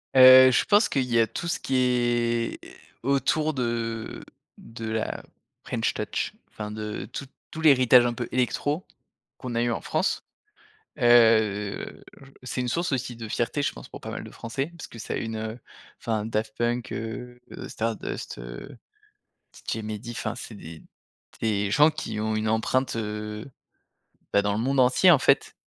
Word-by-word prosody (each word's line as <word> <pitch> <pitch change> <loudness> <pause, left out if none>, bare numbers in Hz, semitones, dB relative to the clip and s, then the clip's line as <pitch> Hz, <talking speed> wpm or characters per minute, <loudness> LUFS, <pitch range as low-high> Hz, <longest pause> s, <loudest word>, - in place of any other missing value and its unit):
Heu, 130 0 +10
je 130 - +3
pense 205 +1 +4
qu'il 135 - +1
y 120 -2 +2
a 115 - +4
tout 175 - -5
ce 170 - -1
qui 135 - -2
est 120 -2 +1 0.4
autour 145 +4 +1
de 115 -3 -3 0.3
de 115 -1 -8
la 110 0 -3 0.4
French - - -1
touch, - - -3 0.2
enfin 105 -1 -7
de 105 0 -5
tout 140 - -5 0.3
tout 160 - -6
l'héritage 130 -5 +6
un 120 - 0
peu - - -4
électro, 145 +6 0 0.5
qu'on 125 -2 -6
a 115 - +2
eu 120 0 +1
en - - -2
France. 155 +5 -1 0.8
Heu, 110 -4 +3 0.2
j 135 0 -15
c'est 125 0 -3
une 125 - -2
source 170 +7 -1
aussi 125 -2 -2
de 115 -1 -7
fierté, 120 +6 -1
je - - 0
pense, - - -11
pour - - -10
pas - - -6
mal - - -5
de - - -10
français, 135 +7 -4
parce - - -8
que 115 - -12
ça - - -5
a - - -1
eu - - -3
une 110 +1 -5 0.4
enfin 110 -2 -2
Daft 110 -1 -2
Punk, 120 0 -1
heu, 120 +3 -6 0.3
Stardust, 115 -1 -4
heu, - - -9 0.9
DJ - - -1
Mehdi 110 +2 -6
enfin 115 0 -3
c'est 120 -2 -9
des 80 -5 -10 0.6
des 105 -2 0
gens 150 +8 +6
qui 105 - -5
ont 110 0 -1
une 110 0 -1
empreinte, 115 +4 0
heu, 105 +2 -5 0.8
bah, 100 - +5
dans 100 0 0
le 105 - -1
monde 135 +4 +1
entier, 130 +9 +6
en 155 - +6
fait. - - +2
120 Hz, 175 wpm, -26 LUFS, 110-130 Hz, 0.9 s, Heu